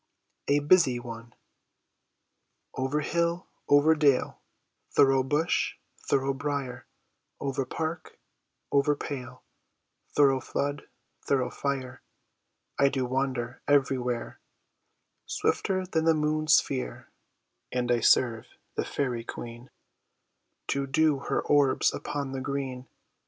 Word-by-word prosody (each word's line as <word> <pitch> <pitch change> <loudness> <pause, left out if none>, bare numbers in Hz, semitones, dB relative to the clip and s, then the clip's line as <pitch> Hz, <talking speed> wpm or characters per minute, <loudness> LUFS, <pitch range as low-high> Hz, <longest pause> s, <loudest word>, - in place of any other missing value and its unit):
A 145 - +4
Busy 145 -3 +4
One 115 -1 -9 1.4
Over 135 +3 -1
hill, 170 +4 0 0.2
over 145 +2 +6
dale, 145 -4 +2 0.5
Thorough 135 -1 +4
bush, 145 +5 0 0.3
thorough 135 0 +2
brier, 140 -3 -4 0.5
Over 135 -1 -2
park, 160 +1 -4 0.5
over 140 +1 +3
pale, 130 -3 -7 0.7
Thorough 135 -2 +5
flood, 145 +2 -3 0.3
thorough 130 -3 0
fire, 130 -2 -3 0.8
I 140 - +5
do 135 -2 -1
wander 130 -1 -2
everywhere, 130 -4 +1 0.9
Swifter 185 -1 0
than 160 -3 -1
the 165 - +5
moonè's 155 0 +3
sphere; 130 -2 -2 0.6
And 125 -1 0
I 120 - +3
serve 115 -1 +3 0.3
the - - -1
fairy 125 -4 -2
queen, 120 +2 -8 1.0
To 140 0 0
dew 150 0 +2
her - - -1
orbs 145 -2 +3
upon 140 -2 -4
the 135 -1 -4
green. 130 -2 -4
135 Hz, 105 wpm, -28 LUFS, 130-145 Hz, 1.4 s, over